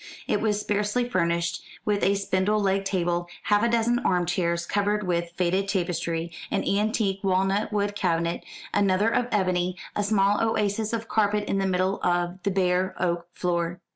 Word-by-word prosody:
It - - +1
was 210 -2 +1
sparsely 210 +4 0
furnished 170 -4 0 0.2
with 205 -1 +1
a 200 - +3
spindle 200 +1 +1
legged 195 -1 +1
table, 175 -2 0 0.2
half 205 0 +3
a 235 - +3
dozen 235 +1 +2
armchairs 175 -2 0
covered 205 +2 0
with 170 -1 0
faded 185 +2 +1
tapestry, 170 -3 -1 0.2
an - - 0
antique 205 -1 0
walnut 195 +2 +1
wood 205 -1 0
cabinet, 170 -3 0 0.3
another 200 +1 +3
of 245 - +1
ebony, 185 -3 +1 0.2
a - - +1
small 205 0 +2
oasis 215 -1 0
of 230 -1 -3
carpet 210 -1 +1
in 195 - 0
the 195 - +1
middle 185 +1 0
of 175 +1 0
the 200 - 0
bare 185 -1 +1
oak 170 -1 -1
floor. 175 -1 -1
195 Hz, 165 wpm, -26 LUFS, 175-210 Hz, 0.3 s, a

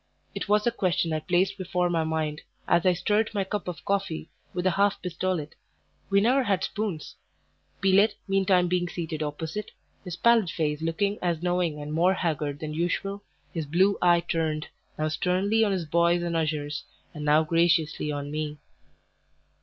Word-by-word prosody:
It - - -5
was 210 0 +4
the 240 - +2
question 175 -6 0
I 155 - 0
placed 180 +5 +1
before 180 -1 0
my 170 -2 +1
mind 155 -1 -2 0.3
as 170 +1 +3
I 180 - +5
stirred 210 +5 +1
my 200 - +1
cup 205 +1 -4
of 170 -6 -6
coffee 195 -5 -2 0.2
with 180 0 -3
a 185 - +4
half 200 +2 +2
pistolet 180 -3 -2 0.6
(we 200 - +4
never 250 +6 +3
had 195 -6 0
spoons), 205 -7 -4 0.7
Pelet 200 +2 +4
meantime 190 -2 +3
being 175 0 0
seated 160 -3 -4
opposite, 160 +7 -4 0.3
his 180 -4 -5
pallid 230 -1 +4
face 150 -2 -1
looking 200 +6 0
as 170 -2 -1
knowing 175 -4 0
and 150 +1 -5
more 180 +4 +3
haggard 150 -5 -2
than 155 -1 -4
usual, 185 +5 -2 0.3
his 160 -3 -3
blue 190 +6 +3
eye 175 -1 +5
turned, 160 -2 -2 0.3
now 155 - 0
sternly 185 +7 +1
on 210 - +2
his 185 -4 -1
boys 170 +2 +2
and 170 -1 -2
ushers, 150 -2 -1 0.3
and 150 - -6
now 150 +1 +4
graciously 165 -2 +2
on 145 0 -4
me. 150 0 -3
175 Hz, 170 wpm, -27 LUFS, 155-195 Hz, 0.7 s, I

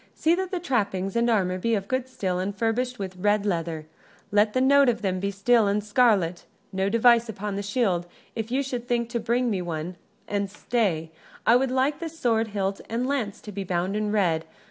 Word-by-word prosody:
"See 320 +2 +2
that 375 +1 -1
the 365 - -2
trappings 200 - -1
and 235 +1 +2
armor 185 -5 +1
be 230 +4 +1
of 200 -1 -3
good 260 +1 -1
steel 185 -7 -2
and 195 +2 -2
furbished 245 +3 0
with 190 -3 -6
red 205 +2 +1
leather: 165 -4 -2 0.5
let 210 +1 +3
the 255 - +2
note 275 0 +5
of 230 -2 -1
them 185 -2 0
be 200 +1 -1
steel 210 +3 +3
and 205 +1 0
scarlet. 205 -6 +2 0.3
No 190 +1 0
device 235 +1 +4
upon 205 -1 -4
the 200 - -2
shield, 200 -4 0 0.3
if 225 0 -3
you 265 +3 0
should 245 -3 -5
think 235 -1 0
to 235 0 -2
bring 240 +1 0
me 190 -3 -1
one; 175 +1 -4 0.3
and 200 -1 -1
stay, 195 -7 -1 0.3
I 230 - +6
would 260 +1 +2
like 265 +3 +1
the 335 - -4
sword 235 -8 0
hilt 200 -2 -2
and 230 +2 -1
the - - -2
lance 240 -8 -2
to 210 - -9
be 200 0 -4
bound 180 +1 -1
in 210 0 -1
red. 175 -6 +1
210 Hz, 215 wpm, -25 LUFS, 190-245 Hz, 0.5 s, I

